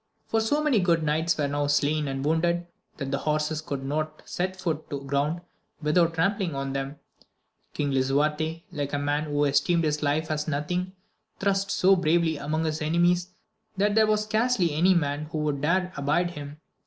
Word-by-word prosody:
For 225 Hz, -, +1 dB
so 290 Hz, +7 st, +1 dB
many 280 Hz, -8 st, +3 dB
good 170 Hz, -3 st, +2 dB
knights 160 Hz, +2 st, +1 dB
were 145 Hz, -2 st, +1 dB
now 145 Hz, 0 st, -1 dB
slain 145 Hz, +1 st, +1 dB
and 135 Hz, 0 st, -3 dB
wounded, 170 Hz, +2 st, +1 dB, 0.3 s
that 140 Hz, -2 st, -4 dB
the 140 Hz, -, 0 dB
horses 155 Hz, 0 st, -1 dB
could 140 Hz, -4 st, -5 dB
not 155 Hz, +2 st, -3 dB
set 185 Hz, +1 st, -3 dB
foot 160 Hz, -4 st, -3 dB
to 140 Hz, -1 st, -4 dB
ground 145 Hz, +5 st, -1 dB, 0.4 s
without 165 Hz, +2 st, +2 dB
trampling 185 Hz, -1 st, 0 dB
on 135 Hz, 0 st, -3 dB
them. 135 Hz, +1 st, -3 dB, 0.8 s
King 145 Hz, -1 st, 0 dB
Lisuarte, 150 Hz, +5 st, 0 dB
like 145 Hz, -1 st, -3 dB
a -, -, +1 dB
man 145 Hz, +1 st, 0 dB
who 145 Hz, -1 st, +1 dB
esteemed 165 Hz, +4 st, +2 dB
his 150 Hz, -1 st, 0 dB
life 150 Hz, +2 st, 0 dB
as 150 Hz, 0 st, -2 dB
nothing, 175 Hz, +5 st, -2 dB, 0.5 s
thrust 195 Hz, 0 st, +1 dB
so 195 Hz, 0 st, +4 dB
bravely 170 Hz, -2 st, +2 dB
among 155 Hz, +3 st, -1 dB
his 155 Hz, 0 st, -2 dB
enemies, 175 Hz, +3 st, +2 dB, 0.5 s
that 205 Hz, +1 st, +2 dB
there 220 Hz, 0 st, +4 dB
wa^ 215 Hz, 0 st, +3 dB
scarcely 215 Hz, -5 st, +1 dB
any 180 Hz, +5 st, +4 dB
man 145 Hz, -2 st, 0 dB
who 155 Hz, +1 st, -5 dB
would 150 Hz, -2 st, -1 dB
dare 180 Hz, +4 st, +1 dB
abide 150 Hz, +5 st, +1 dB
him. 145 Hz, -2 st, -8 dB
155 Hz, 180 wpm, -26 LUFS, 145-175 Hz, 0.8 s, so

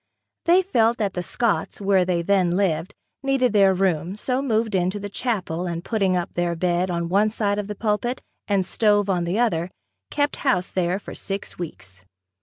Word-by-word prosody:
They 360 Hz, +2 st, +5 dB
felt 235 Hz, -, +2 dB
that 205 Hz, -4 st, -1 dB
the 180 Hz, -, -2 dB
Scotts, 230 Hz, +5 st, -1 dB
where 195 Hz, -2 st, +3 dB
they 175 Hz, -2 st, 0 dB
then 185 Hz, -2 st, +2 dB
lived, 180 Hz, -1 st, 0 dB, 0.3 s
needed 270 Hz, -4 st, +1 dB
their 195 Hz, -2 st, +5 dB
room, 185 Hz, -1 st, 0 dB
so 255 Hz, +5 st, -1 dB
moved 225 Hz, -4 st, 0 dB
into 185 Hz, +2 st, 0 dB
the 205 Hz, 0 st, -6 dB
chapel 185 Hz, -8 st, -2 dB
and 170 Hz, 0 st, -4 dB
putting 195 Hz, -5 st, +1 dB
up 175 Hz, -, -3 dB
their 175 Hz, -1 st, 0 dB
bed 175 Hz, +2 st, 0 dB
on 170 Hz, -1 st, -1 dB
one 200 Hz, +5 st, +3 dB
side 205 Hz, -2 st, -1 dB
of 205 Hz, -, -4 dB
the 210 Hz, -, -5 dB
pulpit 220 Hz, +4 st, -1 dB, 0.3 s
and 195 Hz, -2 st, +1 dB
stove 205 Hz, -2 st, +2 dB
on 175 Hz, -2 st, 0 dB
the 175 Hz, +4 st, -1 dB
other, 185 Hz, -8 st, +1 dB, 0.4 s
kept 290 Hz, 0 st, 0 dB
house 245 Hz, -10 st, +1 dB
there 180 Hz, 0 st, 0 dB
for 205 Hz, -, -9 dB
six 195 Hz, -2 st, -5 dB
weeks. 95 Hz, -, -8 dB
195 Hz, 190 wpm, -23 LUFS, 175-220 Hz, 0.4 s, They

